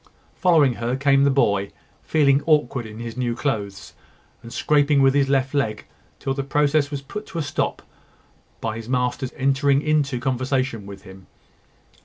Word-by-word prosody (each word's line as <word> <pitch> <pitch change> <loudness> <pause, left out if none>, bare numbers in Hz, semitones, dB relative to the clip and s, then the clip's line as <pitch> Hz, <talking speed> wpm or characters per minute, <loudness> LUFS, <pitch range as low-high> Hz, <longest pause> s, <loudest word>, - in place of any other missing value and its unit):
Following 160 -8 +3
her 120 +2 -1
came 140 0 +3
the - - +4
boy, 100 -8 +1 0.3
feeling 140 -3 +3
awkward 145 -6 +1
in 110 0 -10
his 115 -1 -6
new 120 -2 -2
clothes, 105 -8 -4 0.5
and 115 - -11
scraping 145 +4 +2
with 135 0 +5
his 140 -1 +2
left 135 0 +1
leg 110 -7 -1 0.3
till 135 - -2
the 135 - -2
process 145 +1 +1
was 140 -2 -5
put 195 +6 -8
a 165 - 0
stop 145 - -2
to - - -20 0.8
by 110 -1 -3
his 115 +1 -8
master's 125 0 -1
entering 140 +1 +2
into 150 -4 +1
conversation 130 -3 -2
with 100 -1 -10
him. 95 -1 -14
135 Hz, 165 wpm, -22 LUFS, 120-145 Hz, 0.8 s, with